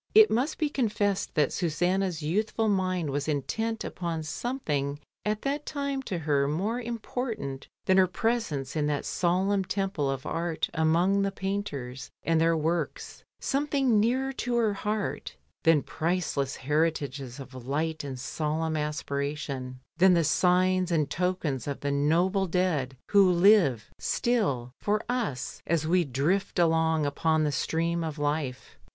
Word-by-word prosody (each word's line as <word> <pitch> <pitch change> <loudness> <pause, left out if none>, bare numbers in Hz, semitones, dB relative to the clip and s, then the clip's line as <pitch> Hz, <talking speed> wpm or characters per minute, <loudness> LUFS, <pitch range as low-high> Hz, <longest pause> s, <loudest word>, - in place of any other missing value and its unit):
It 435 0 +8
must 260 +7 0
be 310 - +1
confessed 210 -8 0
that 150 - +2
Susanna's 175 0 0
youthful 215 +7 0
mind 185 -6 0
was 145 +1 -2
intent 220 +10 -1
upon 170 -3 -3
something 150 - -2 0.3
at 210 0 -1
that 285 +2 -1
time 280 -2 -2
to 185 - -1
her 145 -3 +1
more 200 +11 -1
important 230 - -4 0.2
than 190 - +4
her 190 -1 +6
presence 180 - -1
in 150 -1 +1
that 145 -1 -1
solemn 190 +3 +1
temple 190 -6 -1
of 135 -1 -3
art 165 -1 -2
among 170 +5 +3
the 195 0 0
painters 145 -11 -4
and 165 -1 +2
their 165 0 +3
works, 165 +2 -2 0.2
something 275 -5 +1
nearer 260 +5 +1
to 245 -2 -2
her 225 -3 +2
heart 210 +1 -3 0.3
than 160 -3 +5
priceless 155 -5 -1
heritages 145 -3 -1
of 130 -2 -10
light 155 +3 -1
and 135 -3 -5
solemn 155 +4 -2
aspiration, 140 -3 -3 0.2
than 185 +1 +6
the 170 - +3
signs 185 +3 +3
and 155 -4 +1
tokens 175 -8 -1
of 140 - -4
the 140 - -1
noble 175 +7 +2
dead 160 -8 0
who 195 -3 +6
live 175 - +4
still 140 - 0
for 210 +1 0
us, 230 - -2
as 165 -2 +1
we 175 +2 +3
drift 150 +10 0
along 160 -2 +3
upon 155 +2 +1
the 150 - +1
stream 165 +4 0
of 160 -2 -4
life. 145 -3 -3
170 Hz, 145 wpm, -28 LUFS, 145-200 Hz, 0.3 s, It